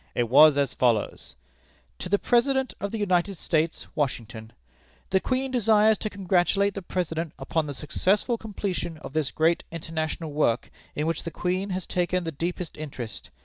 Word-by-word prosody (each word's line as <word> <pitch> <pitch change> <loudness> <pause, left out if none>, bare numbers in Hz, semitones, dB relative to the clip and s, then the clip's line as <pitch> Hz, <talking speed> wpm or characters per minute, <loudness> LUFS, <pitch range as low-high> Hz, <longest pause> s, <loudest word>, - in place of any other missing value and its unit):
It 120 -2 0
was 145 +3 +8
as 140 -3 +1
follows: 115 - 0 0.6
"To 180 - -5
the 205 - +4
President 260 +4 +2
of 200 - -2
the 225 - -4
United 190 -2 +1
States, 160 0 0
Washington: 115 -6 -3 0.6
"The 190 - +4
Queen 260 +4 -1
desires 220 -3 +4
to 215 - -2
congratulate 195 +1 +1
the 195 - -5
President 165 -3 -3
upon 150 +3 -1
the 145 - -5
successful 195 - +1
completion 200 -6 -4
of 155 - -9
this 155 -3 0
great 165 +2 +2
international 160 -1 -4
work, 135 -5 +1 0.2
in 150 - -1
which 165 +1 -1
the - - -5
Queen 185 +4 -2
has 185 -1 -3
taken 180 0 0
the 165 - -3
deepest 170 +3 -4
interest. 125 -9 -7
170 Hz, 165 wpm, -26 LUFS, 150-200 Hz, 0.6 s, was